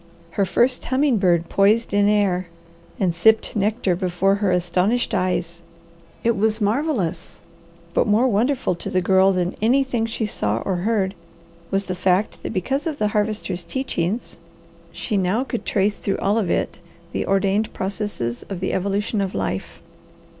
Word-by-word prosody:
Her 200 +3 +1
first 245 +7 +2
humming 265 -1 +2
bird 175 -3 +2
poised 210 +4 +2
in 205 0 +4
air, 190 -4 +1 0.5
and 185 -4 +1
sipped 220 +6 +3
nectar 205 -2 +1
before 185 +1 +1
her 200 -1 0
astonished 180 +7 +1
eyes. 180 -3 -1 0.6
It 235 0 +2
was 215 +2 +1
marvellous, 210 - -1 0.5
but - - +2
more 220 +5 +4
wonderful 250 +2 +1
to 175 - -6
the 185 - +1
Girl 190 +1 +4
than 180 -1 0
anything 245 0 +2
she 225 0 -2
saw 105 - -1
or 190 -2 0
heard 195 0 0 0.6
was 195 0 +1
the 185 - -3
fact 185 +3 0
that - - -4
because 265 - -1
of 310 -3 -3
the 210 -6 +1
Harvester's 210 -4 -1
teachings 225 -2 -3 0.5
she 210 - -2
now 195 +6 +1
could 240 -3 -5
trace 205 +1 +1
through 195 - -1
all 205 +3 +1
of 195 -6 -1
it - - -1 0.3
the - - -2
ordained 195 +2 +1
processes 190 - -3
of 195 -3 -4
the 190 - -2
evolution 200 +3 -1
of 195 -1 -3
life. 95 0 -4
200 Hz, 160 wpm, -22 LUFS, 185-220 Hz, 0.6 s, in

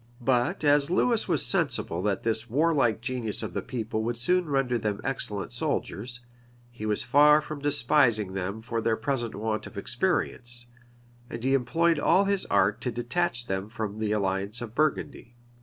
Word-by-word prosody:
But 125 +9 +1
as 145 0 +4
Lewis 225 +5 +3
was - - +2
sensible 85 +2 0
that 100 -1 -1
the 110 0 0
warlike 140 -5 +2
genius 120 -4 -2
of 100 -5 -5
the - - -2
people 110 -3 -4
would 115 +1 -2
soon 180 +7 +2
render 135 -4 +1
them 105 -2 -2
excellent 115 -5 -2
soldiers, 125 -3 -3 0.5
he 110 -3 -6
was 105 0 +1
far 150 +5 +6
from 155 0 -7
despising 120 -7 +2
them 100 +3 -4
for 115 -1 -2
their 115 0 +1
present 120 -1 -2
want 110 0 -3
of 110 - -13
experience; 120 - -2 0.6
and 115 0 -7
he 135 +1 +2
employed 165 +5 +2
all 195 +6 +3
his 200 -1 0
art 100 0 +2
to 125 - -2
detach 120 +3 -1
them 95 0 -3
from 110 -2 -5
the 110 -1 -1
alliance 100 +1 -1
of 115 -2 -7
Burgundy. 145 -4 -2
120 Hz, 170 wpm, -27 LUFS, 110-145 Hz, 0.6 s, far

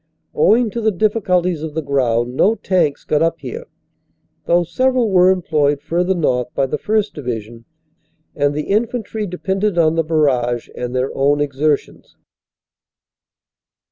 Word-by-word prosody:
Owing 240 - +3
to 235 - -4
the 220 - +2
difficulties 185 -5 0
of 155 -1 -6
the 160 - -1
ground, 125 -3 0
no 215 +10 +3
tanks 170 -9 0
got 150 - 0
up 165 0 +1
here, 475 +3 -7 0.8
though 175 +1 +3
several 250 +5 +1
were 180 -1 +5
employed 150 -6 +1
further 175 +5 -1
north 125 -7 0
by 135 - +2
the 130 - -3
1st. 215 -1 0
Division, 115 -4 -6 0.7
and 145 0 0
the 150 - -2
infantry 220 0 -1
depended 190 +2 -2
on 160 -2 +3
the 165 0 +1
barrage 130 -7 0
and 125 0 -5
their 130 +1 -1
own 140 +2 +2
exertions. 145 +1 -2
165 Hz, 140 wpm, -18 LUFS, 140-195 Hz, 0.8 s, were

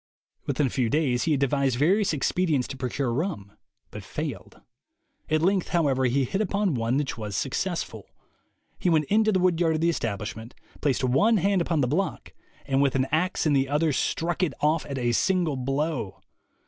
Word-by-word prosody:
Within 145 - +1
a - - 0
few 125 -4 0
days 130 -3 +1
he 165 - +1
had 140 - +1
devised 140 -2 +1
various 190 - +3
expedients 155 -2 0
to 135 - -5
procure 130 -1 -2
rum, 135 - -3 0.4
but - - -8
failed. - - -6 0.7
At 155 0 +1
length, 190 0 +2
however, 140 -7 +1
he 130 +2 +2
hit 190 - -2
upon 200 -3 0
one 120 +1 0
which 145 -4 -2
was 105 -2 -5
successful. - - -3 0.7
He 180 - +1
went 155 -3 +3
into 215 +1 +4
the 190 - +2
wood 180 -2 +2
yard 165 -2 +2
of 155 - -2
the 170 - +3
establishment, 110 -2 -5 0.3
placed 135 -3 0
one 205 - +3
hand 195 0 +2
upon 165 -3 0
the 125 - +2
block, 180 +9 -2 0.3
and 135 0 +1
with 140 -2 +2
an 130 -1 +2
axe 170 +4 0
in 155 - +3
the 135 -1 +2
other 150 +1 +1
struck 170 +6 -1
it 180 - 0
off 155 +2 +1
at 140 - -4
a 120 -2 0
single 175 +2 +1
blow. 135 -4 -2
150 Hz, 190 wpm, -26 LUFS, 130-175 Hz, 0.7 s, into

